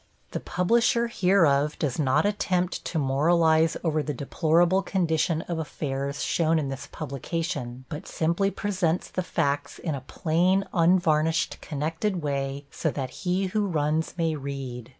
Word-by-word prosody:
The - - -3
publisher 235 +5 +2
hereof 160 -9 +3
does 145 -3 -2
not 135 +5 +2
attempt 185 -3 0
to 165 - -2
moralize 160 +3 +3
over 155 -2 +1
the 150 -1 -3
deplorable 170 +7 +2
condition 165 -4 0
of 170 -2 -4
affairs 140 -2 -3
shown 165 -1 +2
in 145 -3 -1
this 135 0 -6
publication, 140 -4 -4
but 155 +4 -7
simply 170 +5 +1
presents 185 -4 -1
the 185 - -1
facts 145 -4 -1
in 160 - -3
a 140 - -4
plain, 180 +7 +1
unvarnished, 165 -2 +2
connected 160 +5 -2
way, 140 -1 -2
so 160 - -1
that 135 -3 -4
he 185 +2 -1
who 210 -2 +1
runs 155 -1 0
may 165 -2 +1
read. 135 -4 -6
160 Hz, 145 wpm, -26 LUFS, 140-180 Hz, -, hereof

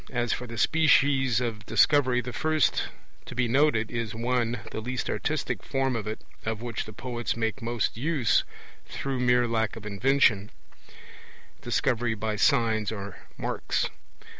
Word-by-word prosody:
As 120 -3 0
for 125 - -5
the 115 0 -7
species 140 -6 +4
of 115 -4 -4
Discovery, 125 +2 +4
the 125 0 -7
first 155 +2 +1 0.4
to - - -8
be 125 0 +1
noted 115 -3 +2
is 115 -2 -3
(1) 120 0 0
the 110 - -4
least 125 +2 -3
artistic - - -2
form 135 -1 -1
of 105 -3 -3
it, 110 - -4 0.2
of 110 -1 -2
which 120 -1 -4
the 110 - -9
poets 120 0 -4
make 115 +3 -2
most 115 -1 -1
use 135 -1 +2 0.4
through 135 -2 -3
mere 125 -1 +3
lack 110 -2 0
of 110 -2 -10
invention, 105 -1 +2 1.1
Discovery 115 -1 0
by 110 0 -2
signs 110 0 +2
or 100 -2 -6 0.2
marks. - - -1
120 Hz, 150 wpm, -27 LUFS, 110-130 Hz, 1.1 s, species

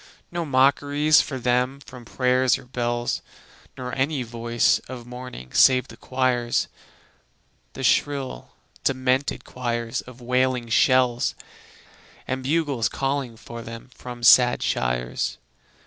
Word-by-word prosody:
No 170 -1 -2
mockeries 145 +2 +4
for 135 - -5
them; 125 +2 0
no 125 -1 -10
prayers 125 0 +2
nor - - -14
bells, 120 -1 -2 0.6
Nor 125 0 -5
any 135 0 0
voice 115 0 +1
of 125 -2 -8
mourning 125 - -9
save 130 -1 +5
the 115 - -11
choirs, 125 -1 0 1.1
The 135 - -7
shrill, 135 - 0 0.3
demented 130 +1 0
choirs 120 -2 -3
of 125 0 -14
wailing 125 -1 0
shells; 125 +1 +3 0.9
And 130 0 -2
bugles 140 -4 0
calling 135 -4 -2
for 115 0 -9
them 115 +2 -10
from 120 -1 -9
sad 120 0 +6
shires. - - -1
125 Hz, 115 wpm, -24 LUFS, 120-130 Hz, 1.1 s, sad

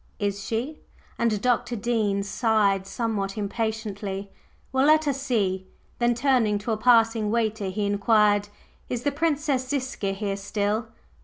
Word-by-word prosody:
"Is 200 -1 -2
she?" 250 +7 -3 0.4
and 230 -3 +1
Dr. 245 -1 +1
Dean 215 -3 0
sighed 200 -2 +1
somewhat 210 -3 -2
impatiently. 205 -2 -3 0.4
"Well, 265 +2 +3
let 310 0 +5
us 275 -1 -1
see!" 190 -8 0 0.3
Then, 240 0 +2
turning 240 -5 +2
to 205 +3 -4
a 220 - 0
passing 225 -2 +4
waiter, 220 -2 0
he 205 +2 -2
inquired: 205 0 +3 0.4
"Is 245 -1 -3
the 285 - +1
Princess 290 -3 0
Ziska 255 -8 -2
here 195 0 -3
still?" 205 +2 -1
220 Hz, 140 wpm, -25 LUFS, 205-245 Hz, 0.4 s, let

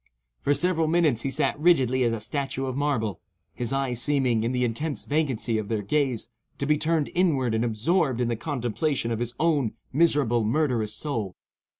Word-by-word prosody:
For 145 - +2
several 170 -2 +1
minutes 155 -8 +2
he 135 - -2
sat 135 +2 0
rigidly 130 -6 +3
as 120 -2 +3
a 115 - -2
statue 135 +4 -3
of 130 -1 -3
marble; 130 - -1 0.3
his 120 -2 -3
eyes 135 -3 -1
seeming, 130 -6 +2
in 115 - 0
the 125 -1 0
intense 135 +6 -2
vacancy 130 -7 0
of 105 - -5
their 110 -2 -1
gaze, 130 0 0 0.3
to 140 - -2
be 150 +1 +3
turned 155 0 0
inward 150 -10 +2
and 110 +1 +1
absorbed 125 - +1
in 120 - +1
the 120 - 0
contemplation 125 0 -2
of 115 - -1
his 120 0 -2
own 150 -8 +1 0.2
miserable, 140 -7 +3
murderous 115 -4 0
soul. 110 -7 -3
130 Hz, 185 wpm, -26 LUFS, 115-150 Hz, 0.3 s, rigidly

